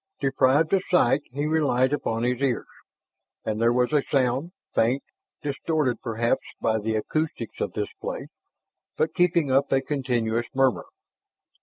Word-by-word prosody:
Deprived 135 +3 +2
of 195 - +4
sight, 145 -6 +4
he 145 +3 -2
relied 145 -4 +2
upon 115 -5 -1
his 125 +1 0
ears. 130 -4 0 0.8
And 110 0 -2
there 115 0 +4
was 125 +3 +1
a 150 - +4
sound, 135 +4 +1 0.2
faint, 125 +5 +2 0.4
distorted 145 -2 -1
perhaps 115 0 0 0.2
by 110 0 +1
the 110 +1 -1
acoustics 120 0 -2
of - - -2
this - - -3
place, - - -5 0.7
but 160 0 +1
keeping 170 -5 +2
up 135 +2 +2
a 135 - +4
continuous 120 -5 -1
murmur. 135 -2 +2
130 Hz, 145 wpm, -25 LUFS, 120-145 Hz, 0.8 s, of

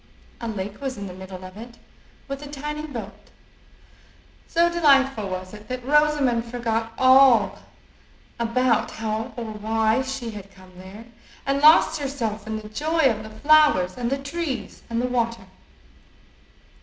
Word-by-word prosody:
A 235 - -5
lake 205 +1 -5
was 265 -3 -4
in 200 - -6
the 185 - -7
middle 185 0 -9
of 185 0 -11
it, 235 +2 -11 0.5
with 275 0 -5
a 295 - -8
tiny 300 +2 -5
boat. 230 -8 -9 1.2
So 340 +1 +3
delightful 275 - +3
was 185 +1 -6
it 210 0 -12
that 255 -1 -5
Rosamond 290 -5 +3
forgot 230 -1 -2
all 260 -5 +5 0.8
about 235 0 +1
how 220 0 -4
or 235 - -4
why 220 +2 0
she 265 -3 -5
had 200 -2 -10
come 185 -1 -16
there, 190 +5 -11 0.4
and 275 0 0
lost 315 +1 +6
herself 230 -6 -3
in 220 0 -3
the 215 0 -10
joy 300 +3 +2
of 215 -1 -4
the 215 - -9
flowers 220 -6 +4
and 240 -1 -2
the 275 - 0
trees 275 - -5
and 230 0 -1
the 250 - 0
water. 235 -2 -1
235 Hz, 155 wpm, -23 LUFS, 215-275 Hz, 1.2 s, lost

